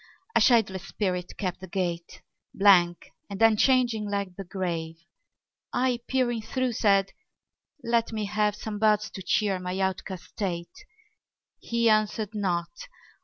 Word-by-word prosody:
A -, -, +5 dB
shadowless 195 Hz, -7 st, +3 dB
spirit 180 Hz, -3 st, -3 dB
kept 185 Hz, -3 st, -3 dB
the 190 Hz, -, -9 dB
gate, 170 Hz, -2 st, -4 dB, 0.3 s
Blank 180 Hz, -4 st, +4 dB, 0.2 s
and 200 Hz, -, -6 dB
unchanging 225 Hz, -1 st, +3 dB
like 200 Hz, -3 st, -3 dB
the 195 Hz, -, -6 dB
grave. 170 Hz, -4 st, -4 dB
10 170 Hz, +1 st, -33 dB, 0.8 s
I 250 Hz, -2 st, +1 dB
peering 245 Hz, -3 st, 0 dB
through 255 Hz, +3 st, -1 dB
said: 195 Hz, -3 st, +2 dB, 0.7 s
'Let 235 Hz, -1 st, +1 dB
me 215 Hz, -2 st, -2 dB
have 210 Hz, 0 st, 0 dB
Some 210 Hz, 0 st, -6 dB
buds 215 Hz, 0 st, +2 dB
to 190 Hz, -, -8 dB
cheer 195 Hz, +1 st, +1 dB
my 180 Hz, +1 st, -4 dB
outcast 190 Hz, -1 st, -2 dB
state.' 180 Hz, -, -5 dB, 0.7 s
He 235 Hz, 0 st, 0 dB
answered 215 Hz, -1 st, +1 dB
not. 195 Hz, -, -3 dB
200 Hz, 135 wpm, -27 LUFS, 185-220 Hz, 0.8 s, A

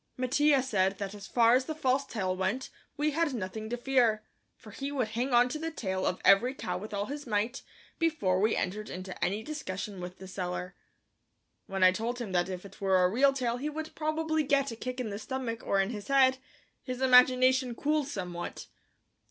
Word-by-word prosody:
Mattia 275 Hz, +2 st, +3 dB
said 195 Hz, -6 st, +1 dB
that 200 Hz, 0 st, -4 dB
as 205 Hz, -1 st, -9 dB
far 235 Hz, -1 st, +4 dB
as 255 Hz, +1 st, +3 dB
the 315 Hz, -, -4 dB
false 275 Hz, -2 st, +1 dB
tail 185 Hz, -5 st, -2 dB
went 190 Hz, +8 st, -2 dB, 0.3 s
we 300 Hz, +1 st, +1 dB
had 305 Hz, -2 st, 0 dB
nothing 215 Hz, +1 st, -5 dB
to 245 Hz, -, -2 dB
fear, 240 Hz, -4 st, +2 dB, 0.3 s
for 215 Hz, -, -14 dB
he 275 Hz, +6 st, -5 dB
would 255 Hz, -6 st, -1 dB
hang 240 Hz, +5 st, -2 dB
onto 245 Hz, +5 st, +3 dB
the 325 Hz, +1 st, -2 dB
tail 190 Hz, -11 st, -2 dB
of 180 Hz, -, -1 dB
every 235 Hz, +7 st, +5 dB
cow 180 Hz, -8 st, -4 dB
with 210 Hz, +4 st, -6 dB
all 200 Hz, 0 st, -2 dB
his 285 Hz, +3 st, -6 dB
might, 220 Hz, +4 st, -1 dB, 0.4 s
before 300 Hz, -, +1 dB
we 215 Hz, +3 st, +2 dB
entered 210 Hz, +4 st, -3 dB
into 185 Hz, 0 st, -6 dB
any 205 Hz, +4 st, -1 dB
discussion 205 Hz, -10 st, -5 dB
with 180 Hz, 0 st, -7 dB
the 190 Hz, -, -10 dB
seller. 180 Hz, 0 st, -4 dB, 0.9 s
When 195 Hz, -1 st, -1 dB
I 185 Hz, -, +8 dB
told 230 Hz, +6 st, -3 dB
him 235 Hz, -6 st, -5 dB
that 175 Hz, 0 st, +1 dB
if 185 Hz, 0 st, -6 dB
it 195 Hz, 0 st, -13 dB
were 190 Hz, -2 st, +3 dB
a 180 Hz, -, +4 dB
real 265 Hz, +7 st, +4 dB
tail 245 Hz, -3 st, -1 dB
he 290 Hz, +4 st, -3 dB
would 315 Hz, +1 st, -6 dB
probably 315 Hz, 0 st, 0 dB
get 275 Hz, -2 st, +1 dB
a -, -, -6 dB
kick 255 Hz, +2 st, -5 dB
in 230 Hz, -4 st, -3 dB
the 200 Hz, -, -5 dB
stomach 235 Hz, -1 st, -4 dB
or 195 Hz, -, +1 dB
on 195 Hz, +3 st, +1 dB
his 210 Hz, -3 st, -7 dB
head, 265 Hz, -1 st, +4 dB, 0.4 s
his 255 Hz, -1 st, -5 dB
imagination 255 Hz, 0 st, +5 dB
cooled 300 Hz, +2 st, 0 dB
somewhat. 180 Hz, -8 st, -5 dB
235 Hz, 205 wpm, -30 LUFS, 195-270 Hz, 0.9 s, I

